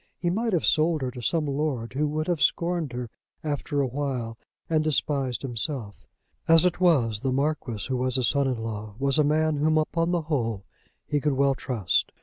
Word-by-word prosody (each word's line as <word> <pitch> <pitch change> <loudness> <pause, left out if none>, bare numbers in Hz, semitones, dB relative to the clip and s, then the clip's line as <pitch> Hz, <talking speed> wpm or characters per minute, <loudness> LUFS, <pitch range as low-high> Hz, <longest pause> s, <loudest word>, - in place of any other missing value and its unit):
He 175 -1 -1
might 225 +5 0
have 175 -5 +1
sold 155 -1 +3
her 125 - -2
to 125 -1 -8
some 155 +6 +1
lord 140 -5 -2
who 150 +3 +1
would 155 +1 -2
have 170 -4 -1
scorned 170 0 +1
her 120 -2 -5 0.3
after 145 -1 -1
a - - +2
while 125 -4 -3 0.3
and 155 -1 +2
despised 140 -4 0
himself. 120 -3 -4 0.4
As 165 +1 +6
it 180 -1 +1
was, 125 - +3
the 130 +3 -1
Marquis, 135 -6 -1
who 130 -2 -1
was 130 0 -1
his 130 -2 +2
son 140 -1 +2
in 130 -2 -1
law, 110 -2 -5
was 140 +3 +1
a - - +6
man 155 +1 +2
whom 155 +2 +2
upon 165 +2 +1
the 175 -1 +1
whole 115 -10 -2 0.4
he 145 - 0
could 150 0 +1
well 140 +1 +3
trust. 120 -8 0
140 Hz, 200 wpm, -26 LUFS, 125-155 Hz, 0.4 s, As